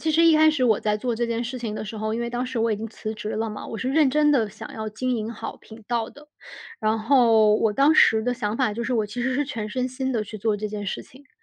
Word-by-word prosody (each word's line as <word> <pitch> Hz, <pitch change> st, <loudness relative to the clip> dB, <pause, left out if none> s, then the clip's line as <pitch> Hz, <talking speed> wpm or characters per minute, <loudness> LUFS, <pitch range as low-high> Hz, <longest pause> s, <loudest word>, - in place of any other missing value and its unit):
其 320 Hz, -, 0 dB
实 330 Hz, +2 st, +4 dB
一 325 Hz, -1 st, +6 dB
开 315 Hz, 0 st, +6 dB
始 275 Hz, -5 st, 0 dB
我 220 Hz, -4 st, +3 dB
在 210 Hz, 0 st, 0 dB
做 240 Hz, +2 st, -2 dB
这 235 Hz, +1 st, -1 dB
件 230 Hz, 0 st, -1 dB
事 245 Hz, +2 st, -5 dB
情 220 Hz, -3 st, -4 dB
的 -, -, -4 dB
时 220 Hz, +1 st, -7 dB
候， 215 Hz, +1 st, -2 dB
因 230 Hz, -, -2 dB
为 235 Hz, -, -2 dB
当 245 Hz, +1 st, -2 dB
时 255 Hz, -2 st, -4 dB
我 225 Hz, 0 st, +1 dB
已 -, -, -1 dB
经 225 Hz, +2 st, -6 dB
辞 220 Hz, 0 st, -6 dB
职 210 Hz, 0 st, -6 dB
了 225 Hz, +1 st, -2 dB
嘛， 210 Hz, -1 st, -7 dB
我 225 Hz, -, -6 dB
是 255 Hz, -, -2 dB
认 285 Hz, 0 st, +3 dB
真 300 Hz, +1 st, +3 dB
地 230 Hz, -7 st, +2 dB
想 210 Hz, -, -10 dB
要 220 Hz, -1 st, -4 dB
经 250 Hz, +4 st, -2 dB
营 220 Hz, 0 st, -3 dB
好 225 Hz, -, -7 dB
频 220 Hz, 0 st, -14 dB
道 235 Hz, -2 st, -1 dB
的。 290 Hz, +1 st, -16 dB, 0.5 s
然 220 Hz, +1 st, +1 dB
后 225 Hz, -3 st, +4 dB
我 215 Hz, 0 st, +2 dB
当 280 Hz, +7 st, +4 dB
时 220 Hz, -7 st, +5 dB
的 250 Hz, 0 st, 0 dB
想 215 Hz, -2 st, -2 dB
法 255 Hz, -5 st, +1 dB
就 235 Hz, -, -3 dB
是， 240 Hz, -, -2 dB
我 220 Hz, -3 st, +1 dB
其 240 Hz, +4 st, -5 dB
实 260 Hz, +2 st, 0 dB
是 290 Hz, -, +1 dB
全 225 Hz, -6 st, -5 dB
身 255 Hz, +3 st, -2 dB
心 260 Hz, +1 st, -3 dB
地 220 Hz, -3 st, -1 dB
去 215 Hz, +1 st, -8 dB
做 215 Hz, 0 st, 0 dB
这 215 Hz, -, -3 dB
件 210 Hz, -1 st, -5 dB
事 -, -, -4 dB
情， 265 Hz, +2 st, -18 dB
就 285 Hz, -, -30 dB
230 Hz, 335 characters per minute, -24 LUFS, 215-255 Hz, 0.5 s, 一